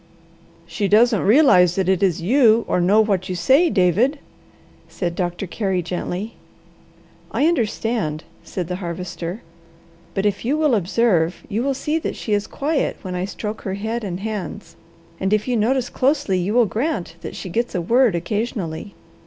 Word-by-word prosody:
"She 200 +4 -2
doesn't 220 +1 +4
realize 200 - +5
that 190 -2 0
it 190 -2 +2
is 180 -3 +1
you 230 +1 +4
or 180 - +1
know 200 +5 +5
what 195 -3 0
you 185 - -2
say, 270 - +4
David," 210 - +2 0.7
said 175 -3 -3
Doctor 175 +1 -3
Carey 190 -1 -2
gently. 180 +5 -4 0.9
"I 290 - +1
understand," 225 - 0 0.2
said 180 -3 -5
the 180 0 -3
Harvester. 180 +1 -5 0.7
"But 195 - 0
if 205 -1 0
you 270 +6 0
will 305 -4 +2
observe, 190 -4 +1
you 215 +3 -2
will 275 +1 0
see 305 +4 -1
that - - -4
she 215 - -3
is 205 0 0
quiet 290 +1 -1
when 185 -2 -5
I 180 +1 -2
stroke 210 +2 -5
her 190 -1 -3
head 220 +3 -3
and 185 -2 -4
hands, 215 -2 -5 0.4
and 190 +2 0
if 215 +2 +1
you 250 - +1
notice 245 +3 +1
closely 265 -8 +1
you 195 +5 -1
will 245 -1 +5
grant 215 - -3
that - - -7
she 185 - -6
gets 235 +4 -2
a - - +1
word 235 +2 +3
occasionally. 200 -1 -3
205 Hz, 170 wpm, -21 LUFS, 180-235 Hz, 0.9 s, realize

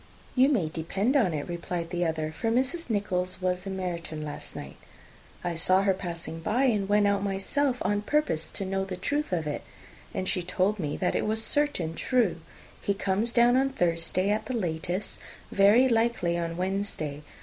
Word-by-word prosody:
"You 260 +2 +5
may 215 - +2
depend 190 - -1
on 225 -11 +4
it," 150 -2 -3
replied 170 -1 -4
the 175 -1 0
other, 160 -1 -1
"for 225 +8 -2
Mrs. 260 +7 0
Nichols 185 -4 0
was 180 +1 -1
in 190 -1 -3
Meryton 170 -4 -4
last 145 - -7
night: - - -8 0.7
I 175 -1 -1
saw 185 +3 +4
her 195 -1 +3
passing 170 -3 -5
by, 220 +10 +1
and 210 -7 +2
went 205 0 +4
out 200 0 +2
myself 245 +8 0
on 205 0 +1
purpose 255 - 0
to 195 - -4
know 195 0 -1
the 190 -2 -5
truth 290 +3 -1
of 165 -4 0
it; 150 -1 -3 0.5
and 185 - -3
she 180 - +1
told 185 +4 0
me 150 -4 -2
that 180 - 0
it - - 0
was 220 +1 +2
certainly 290 - +2
true. 225 -9 +1 0.4
He 200 - 0
comes 200 +3 0
down 240 +1 +5
on 270 +1 +3
Thursday, 180 -3 0
at 215 +1 -1
the 255 - -1
latest, 175 0 -2 0.3
very 205 +6 +6
likely 230 -7 +1
on 170 -1 -2
Wednesday. 185 -6 -2
190 Hz, 185 wpm, -28 LUFS, 170-225 Hz, 0.7 s, very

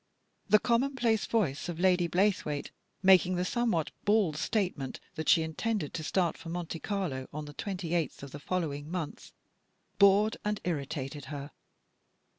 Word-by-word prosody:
The 215 - +8
commonplace 235 -1 +1
voice 175 -9 0
of 170 -1 -5
Lady 180 -1 +3
Blaythewaite, 180 -6 0 0.3
making 185 -1 +6
the 180 +1 0
somewhat 225 -7 0
bald 205 -7 +3
statement 155 - -1
that 160 -3 -3
she 165 - +6
intended 160 +2 -2
to 160 - -4
start 170 +2 0
for 165 - -8
Monte 170 -1 -4
Carlo 175 -10 -3
on 150 +1 -5
the 145 - -9
28th 175 -3 -2
of 140 - -8
the 145 - -7
following 150 -3 -3
month, 175 -4 -5 0.7
bored 200 +2 +5
and 210 0 -1
irritated 145 -3 -3
her. 145 0 -6
175 Hz, 145 wpm, -30 LUFS, 150-200 Hz, 0.7 s, The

